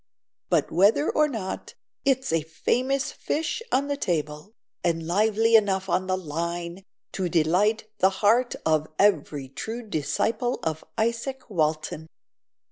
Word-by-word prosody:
But -, -, +2 dB
whether 200 Hz, -, +4 dB
or 305 Hz, 0 st, +3 dB
not, 220 Hz, -9 st, -5 dB, 0.3 s
it's 265 Hz, -6 st, +1 dB
a 165 Hz, -, +3 dB
famous 255 Hz, -, -1 dB
fish 320 Hz, +7 st, -2 dB
on 275 Hz, +2 st, +2 dB
the 285 Hz, -, -1 dB
table, 160 Hz, -, -3 dB, 0.3 s
and 165 Hz, -1 st, 0 dB
lively 220 Hz, +5 st, +3 dB
enough 195 Hz, -3 st, +3 dB
on 185 Hz, +1 st, +1 dB
the 185 Hz, 0 st, +1 dB
line 170 Hz, +2 st, -4 dB, 0.3 s
to 185 Hz, -2 st, -2 dB
delight 180 Hz, +8 st, +2 dB
the 190 Hz, -, +5 dB, 0.2 s
heart 240 Hz, +4 st, +4 dB
of 155 Hz, -1 st, +2 dB
every 155 Hz, -8 st, +2 dB
true 225 Hz, -, -6 dB
disciple 220 Hz, -, -1 dB
of 160 Hz, -1 st, -2 dB
Isaac 235 Hz, +3 st, -2 dB
Walton." 155 Hz, -2 st, -1 dB
190 Hz, 130 wpm, -26 LUFS, 160-230 Hz, 0.3 s, the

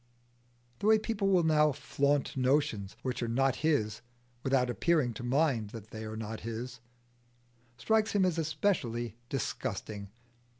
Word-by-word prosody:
The 205 Hz, -, 0 dB
way 220 Hz, 0 st, +7 dB
people 215 Hz, -2 st, -1 dB
will 185 Hz, -3 st, +4 dB
now 150 Hz, -1 st, +4 dB
flaunt 145 Hz, 0 st, 0 dB
notions 125 Hz, -7 st, +1 dB
which 130 Hz, -1 st, -2 dB
are 120 Hz, -, -1 dB
not 130 Hz, +3 st, +2 dB
his 110 Hz, -9 st, +1 dB, 0.4 s
without 130 Hz, -1 st, +2 dB
appearing 125 Hz, +2 st, +1 dB
to 120 Hz, -, -7 dB
mind 125 Hz, -4 st, +1 dB
that 110 Hz, -1 st, -10 dB
they 110 Hz, 0 st, -6 dB
are 110 Hz, 0 st, -5 dB
not 110 Hz, 0 st, -5 dB
his, 120 Hz, +2 st, -5 dB, 1.0 s
strikes 220 Hz, -, +2 dB
him 200 Hz, -2 st, +4 dB
as 170 Hz, -3 st, +1 dB
especially 125 Hz, -, -1 dB
disgusting. 105 Hz, -5 st, -3 dB
130 Hz, 140 wpm, -31 LUFS, 115-160 Hz, 1.0 s, way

